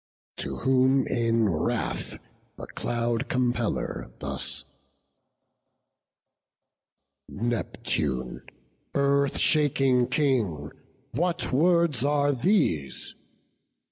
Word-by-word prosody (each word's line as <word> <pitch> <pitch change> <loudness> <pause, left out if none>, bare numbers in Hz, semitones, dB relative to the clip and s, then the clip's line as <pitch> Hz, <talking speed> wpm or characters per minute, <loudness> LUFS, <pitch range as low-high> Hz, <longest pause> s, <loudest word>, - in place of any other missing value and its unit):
To - - -2
whom 130 +1 +3
in 115 -2 +1
wrath 80 -6 -2 0.4
the - - -7
Cloud 120 +1 -2
compeller 125 -3 -1
thus: - - -3 2.7
"Neptune, 80 - -2 0.5
Earth 140 0 +2
shaking 135 -5 +3
King, 120 - 0 0.4
what 170 +2 0
words 170 -2 +3
are 145 0 +2
these? 120 - +1
130 Hz, 70 wpm, -26 LUFS, 115-140 Hz, 2.7 s, whom